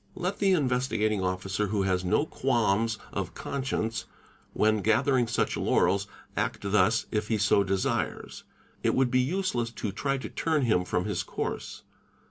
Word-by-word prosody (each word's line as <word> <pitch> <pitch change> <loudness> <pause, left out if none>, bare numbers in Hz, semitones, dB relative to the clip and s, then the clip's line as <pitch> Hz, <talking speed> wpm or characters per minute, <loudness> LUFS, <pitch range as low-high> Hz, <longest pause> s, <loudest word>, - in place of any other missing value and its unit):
_ - - -40
Let 185 +2 -3
the 195 -2 +4
Investigating 125 - +1
Officer 95 +2 -1
who 100 -1 0
has 95 -1 0
no 105 +11 +2
qualms 115 -5 +1 0.2
of - - -4
conscience 125 -5 -2 0.5
when 110 -1 +2
gathering 120 +4 +3
such 120 - 0
laurels, 100 +1 +2 0.3
act - - -1
thus 105 +2 +2
if 105 -1 -1
he 110 - +1
so 105 -1 +3
desires. 95 0 -2 0.4
It - - +1
would 130 -2 +2
be 130 - +3
useless 130 -5 -1
to 105 -4 -4
ry 140 -1 +1
to 130 - -6
turn 155 -3 0
him 100 -7 +2
from - - -1
his - - -1
course. - - -5
110 Hz, 160 wpm, -28 LUFS, 100-130 Hz, 0.5 s, the